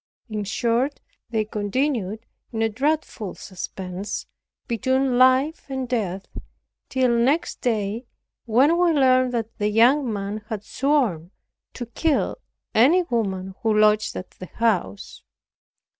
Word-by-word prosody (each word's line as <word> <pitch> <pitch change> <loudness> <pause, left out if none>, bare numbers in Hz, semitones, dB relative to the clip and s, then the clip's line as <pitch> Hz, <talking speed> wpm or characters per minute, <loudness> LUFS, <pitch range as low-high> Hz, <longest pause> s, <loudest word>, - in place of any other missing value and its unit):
In 210 -1 -3
short 235 +6 0 0.3
they 220 -2 0
continued 220 0 -2 0.3
in 225 -1 -1
a 225 - +2
dreadful 265 - -2
suspense, 185 +1 -6 0.4
between 260 +1 +1
life 260 +5 +3
and 265 -1 -3
death, 200 -6 -2 0.6
till 255 -2 +2
next 265 +8 +1
day, 225 0 -1 0.4
when 260 +8 +4
we 350 -2 +4
learned 255 -3 +4
that 225 -1 -3
the 210 0 +1
young 240 +4 +4
man 205 +1 -4
had 210 -2 -4
sworn 245 - 0 0.4
to 245 - -5
kill 305 - 0 0.3
any 300 +11 +5
woman 195 - -2
who 220 -2 +2
lodged 215 0 +3
at 185 - -7
the 185 - -10
house. 190 - -1
230 Hz, 125 wpm, -23 LUFS, 210-260 Hz, 0.6 s, any